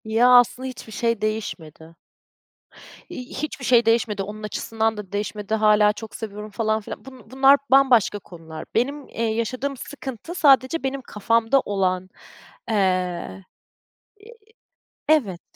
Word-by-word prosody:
Ya, 225 +3 +3
aslında 250 +2 +2
hiçbir 245 -3 -9
şey 230 +1 -1
değişmedi. 165 -7 -5 1.1
İii, 250 - -7
hiçbir 280 -3 -5
şey 240 -2 +4
değişmedi, 225 -3 +1
onun 210 +2 -8
açısından 220 +1 -2
da 200 -3 -8
değişmedi. 205 +1 -4
Hâlâ 210 -1 +4
çok 220 0 -10
seviyorum 210 -1 -7
falan 220 0 0
filan. 205 - -9
Bu 255 -4 -14
bunlar 270 +1 +6
bambaşka 255 -7 +4
konular. 165 -4 -10
Benim, 275 +5 -1
eee, 230 - -4
yaşadığım 240 +5 -2
sıkıntı 270 +4 -8
sadece 275 -1 +4
benim 270 0 -2
kafamda 230 +3 +1
olan, 185 -4 -1 0.6
eee 185 -2 -1 0.8
Eee, 430 +3 -15 0.8
evet. 220 - +2
220 Hz, 125 wpm, -23 LUFS, 205-260 Hz, 1.1 s, bunlar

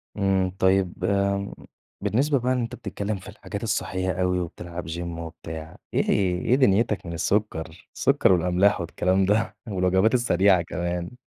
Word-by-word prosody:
امم. 95 -2 +1
طيّب 95 -1 +2
آمم، 100 0 0 0.5
بالنسبة 140 +4 +2
بقى 125 +1 +1
أنت 125 -1 -2
بتتكلّم 100 -1 -4
في 95 - -11
الحاجات - - -7
الصحية 95 0 -1
أوي 90 0 +1
وبتلعب 85 0 -6
gym 80 - -4
وبتاع 80 -1 -7 0.2
إيه - - +2
ه - - -4 0.4
إيه 125 - +4
دنيتك 110 -6 +2
من 85 - -5
السكر؟ 90 -2 -2
السكر - - +3
والأملاح 90 +3 +2
والكلام 95 +3 +1
ده 105 +3 +1
والوجبات 95 +2 +2
السريعة 100 -6 +4
كمان؟ 85 +5 -4
95 Hz, 145 wpm, -25 LUFS, 90-105 Hz, 0.5 s, إيه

